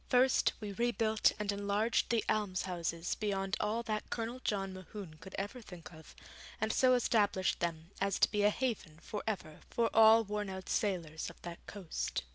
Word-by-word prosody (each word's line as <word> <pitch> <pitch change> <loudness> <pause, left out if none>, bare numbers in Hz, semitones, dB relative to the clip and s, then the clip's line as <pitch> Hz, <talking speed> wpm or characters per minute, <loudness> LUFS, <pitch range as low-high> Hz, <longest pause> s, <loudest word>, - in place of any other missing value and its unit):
First, 255 0 +4
we 210 -2 -5
rebuilt 225 0 +2
and 210 -1 -1
enlarged 205 +3 +1
the 230 -2 +1
almshouses 180 -4 -1
beyond 195 -2 -1
all 220 +3 0
that 215 -2 -3
Colonel 235 +2 -3
John 195 -2 -1
Mohune 185 -3 -9
could 190 +4 -10
ever 205 +6 -4
think 180 -5 -11
of, 160 0 -14 0.4
and 220 +1 0
so 255 -1 +5
established 205 -5 +2
them 165 0 -3
as 195 0 +1
to - - +4
be 210 - +1
a 205 - +6
haven 210 -9 -2
for 210 - -4
ever 175 -8 -3
for 230 -1 +1
all 225 +1 +8
worn 210 -1 -3
out 190 0 -7
sailors 170 -6 -1
of - - -14
that 170 -1 -8
coast. 195 -5 -3
205 Hz, 175 wpm, -34 LUFS, 185-220 Hz, 0.4 s, all